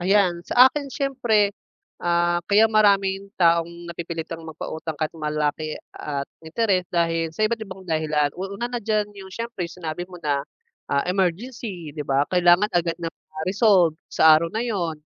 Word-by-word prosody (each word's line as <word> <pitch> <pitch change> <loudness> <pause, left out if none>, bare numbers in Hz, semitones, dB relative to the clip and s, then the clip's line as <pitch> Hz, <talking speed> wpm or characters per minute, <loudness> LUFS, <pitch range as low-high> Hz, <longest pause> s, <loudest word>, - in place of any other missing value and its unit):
Ayan. 185 -1 +3
Sa 250 +2 +8
akin, 285 -2 -4
siyempre, 240 -7 +1 0.5
ah, 175 0 +2
kaya 210 +2 +6
maraming 200 -2 +3
taong 170 0 +2
napipilitang 165 -1 -5
magpautang 160 0 -6
kahit 155 0 -2
malaki 155 -1 -2 0.2
at 140 -2 -4 0.2
interes 185 +2 0
dahil 165 -1 0
sa 215 - +1
iba't 225 +1 0
ibang 190 -3 -8
dahilan. 155 -3 0
U 190 +2 -5
una 240 +3 -3
na 245 - -2
diyan, 210 -1 -1
'yong 190 -2 -11
siyempre 230 -5 -4
'yong - - -13
sinabi 160 +2 -3
mo 180 - -10
na, 145 -2 +1 0.5
ah, 140 0 +1
emergency, 185 - -2
'di 150 - -4
ba, 140 +1 +2
kailangan 180 +3 +4
agad 170 -1 +1
na 165 -1 -4
ma-resolve 185 +1 +2
sa 160 0 +6
araw 170 - -2
na 220 +6 -2
'yon, 180 -9 -2
175 Hz, 165 wpm, -23 LUFS, 160-205 Hz, 0.5 s, Sa